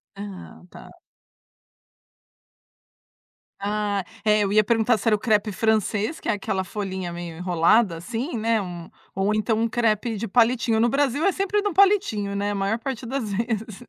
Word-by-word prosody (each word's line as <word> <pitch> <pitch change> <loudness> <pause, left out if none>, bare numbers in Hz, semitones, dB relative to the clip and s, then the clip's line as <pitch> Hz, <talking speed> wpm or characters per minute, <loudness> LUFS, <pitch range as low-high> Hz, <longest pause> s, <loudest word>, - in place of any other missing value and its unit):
Ah, 200 -2 -9
tá. - - -13 2.7
Ah, 205 -1 -1 0.2
é 210 0 +4
eu 195 - -1
ia 215 0 +5
perguntar 225 +1 +2
se 230 - -5
era 215 - +5
o - - -5
crepe 215 -2 +1
francês, 220 - 0
que - - -9
é - - +3
aquela 195 -2 -2
folhinha 190 -2 -5
meio 170 -2 -7
enrolada 180 +2 +2
assim 235 - -4
né, 225 0 +1
um, 175 -3 -7 0.2
ou 195 +2 0
então 220 +1 0
um 230 - +2
crepe 225 -1 0
de 230 +2 -3
palitinho, 230 0 +2
no 235 +1 +3
Brasil 280 +2 +1
é 395 - +4
sempre 395 +2 0
no 410 -4 -2
palitinho 375 - +2
né, 205 +1 -1
a - - -3
maior 200 +4 -1
parte 255 -1 -5
das 235 -4 -3
vezes. 220 +1 -3
215 Hz, 170 wpm, -24 LUFS, 200-235 Hz, 2.7 s, ia